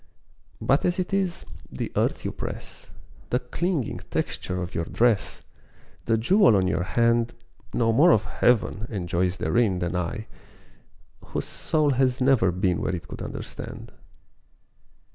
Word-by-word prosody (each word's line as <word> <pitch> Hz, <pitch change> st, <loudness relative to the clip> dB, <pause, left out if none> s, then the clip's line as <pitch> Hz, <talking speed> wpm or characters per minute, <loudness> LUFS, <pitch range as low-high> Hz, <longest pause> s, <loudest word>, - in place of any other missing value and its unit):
But 135 Hz, +2 st, +2 dB
as 175 Hz, 0 st, +1 dB
it 185 Hz, +1 st, -2 dB
is, 190 Hz, -3 st, 0 dB, 0.3 s
the -, -, -4 dB
earth -, -, 0 dB
you -, -, -1 dB
press, -, -, -7 dB, 0.4 s
The 125 Hz, -, +2 dB
clinging 145 Hz, -, -2 dB
texture 90 Hz, 0 st, -2 dB
of 90 Hz, 0 st, -5 dB
your 85 Hz, -, -1 dB
dress, 115 Hz, 0 st, +1 dB, 0.6 s
The 115 Hz, -1 st, +2 dB
jewel 185 Hz, -, +5 dB
on 95 Hz, -2 st, +3 dB
your 90 Hz, -, 0 dB
hand 115 Hz, +4 st, +1 dB, 0.4 s
Know 115 Hz, -1 st, +2 dB
more 150 Hz, +9 st, +6 dB
of 110 Hz, -, +4 dB
Heaven 110 Hz, -2 st, +1 dB
and 95 Hz, -6 st, -4 dB
joys 90 Hz, +2 st, 0 dB
therein 95 Hz, +4 st, +2 dB
Than 90 Hz, 0 st, -2 dB
I, 90 Hz, +5 st, -2 dB, 1.0 s
whose -, -, -4 dB
soul 155 Hz, -3 st, +1 dB
has 130 Hz, -1 st, +2 dB
never 130 Hz, -8 st, +4 dB
been 90 Hz, 0 st, 0 dB
Where -, -, -1 dB
it 90 Hz, +1 st, -8 dB
could -, -, -8 dB
understand. -, -, -7 dB
115 Hz, 145 wpm, -25 LUFS, 90-135 Hz, 1.0 s, more